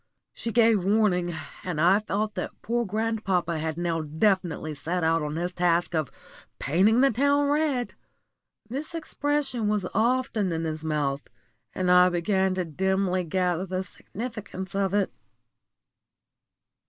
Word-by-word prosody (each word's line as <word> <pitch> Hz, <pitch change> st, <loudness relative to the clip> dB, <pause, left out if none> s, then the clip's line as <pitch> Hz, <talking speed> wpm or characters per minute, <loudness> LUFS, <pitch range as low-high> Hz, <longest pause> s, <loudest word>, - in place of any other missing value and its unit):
She 230 Hz, -, -4 dB
gave 225 Hz, -4 st, +4 dB
warning, 185 Hz, -4 st, +2 dB, 0.3 s
and 175 Hz, -4 st, -3 dB
I 180 Hz, +5 st, +5 dB
felt 210 Hz, 0 st, -2 dB
that -, -, -5 dB
poor 235 Hz, 0 st, 0 dB
grandpapa 195 Hz, -6 st, -1 dB
had 160 Hz, 0 st, -3 dB
now 170 Hz, -2 st, -1 dB
definitely 160 Hz, 0 st, 0 dB
set 170 Hz, +4 st, -3 dB
out 165 Hz, 0 st, +2 dB
on 150 Hz, 0 st, -3 dB
his 175 Hz, +2 st, -2 dB
great 180 Hz, -, -22 dB
task 175 Hz, 0 st, +2 dB
of 155 Hz, -4 st, -1 dB, 0.5 s
"painting 195 Hz, -, +3 dB
the 275 Hz, -, +5 dB
town 285 Hz, +4 st, +2 dB
red." 290 Hz, -5 st, 0 dB, 0.7 s
This 280 Hz, +8 st, -5 dB
expression 290 Hz, -7 st, -1 dB
was 210 Hz, -3 st, 0 dB
often 230 Hz, -5 st, +1 dB
in 165 Hz, 0 st, -2 dB
his 155 Hz, -1 st, -3 dB
mouth, 145 Hz, -3 st, -1 dB, 0.5 s
and 180 Hz, -1 st, +1 dB
I 180 Hz, 0 st, +7 dB
began 190 Hz, +2 st, +1 dB
to 185 Hz, -1 st, -1 dB
dimly 185 Hz, +3 st, 0 dB
gather 180 Hz, +1 st, 0 dB
the 185 Hz, +1 st, -2 dB
significance 205 Hz, -2 st, -7 dB
of 195 Hz, 0 st, 0 dB
it. 200 Hz, -2 st, +1 dB
190 Hz, 140 wpm, -26 LUFS, 170-220 Hz, 0.7 s, I